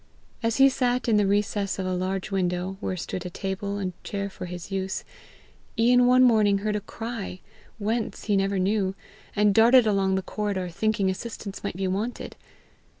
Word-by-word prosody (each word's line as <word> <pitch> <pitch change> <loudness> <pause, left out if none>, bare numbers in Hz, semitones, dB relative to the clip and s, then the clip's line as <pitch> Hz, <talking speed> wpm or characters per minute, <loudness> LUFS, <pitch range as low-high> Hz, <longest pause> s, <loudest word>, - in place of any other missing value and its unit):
As 230 -1 0
he 270 0 +8
sat 250 -1 0
in 220 -2 +4
the 205 -1 +3
recess 205 0 0
of 190 - -3
a 185 - -1
large 185 +2 -2
window, 180 0 -1
where 185 -3 -3
stood 175 +1 -4
a 180 - -5
table 195 +2 -4
and 185 -2 -3
chair 200 -1 -4
for 180 - -7
his 175 +1 -8
use, 190 0 -2 0.7
Ian 245 +2 +5
one 255 +1 +6
morning 215 -5 +4
heard 210 -1 +1
a 210 - -1
cry 225 -4 -6 0.4
whence, 220 +1 -2
he 210 - +1
never 195 0 +1
knew 190 0 +1 0.4
and 210 -1 +4
darted 235 +3 +6
along 195 -2 +2
the 190 - -1
corridor, 200 -4 -2
thinking 200 +2 0
assistance 205 0 -7
might 200 - -3
be 190 0 -1
wanted. 205 +6 -3
200 Hz, 180 wpm, -26 LUFS, 190-220 Hz, 0.7 s, he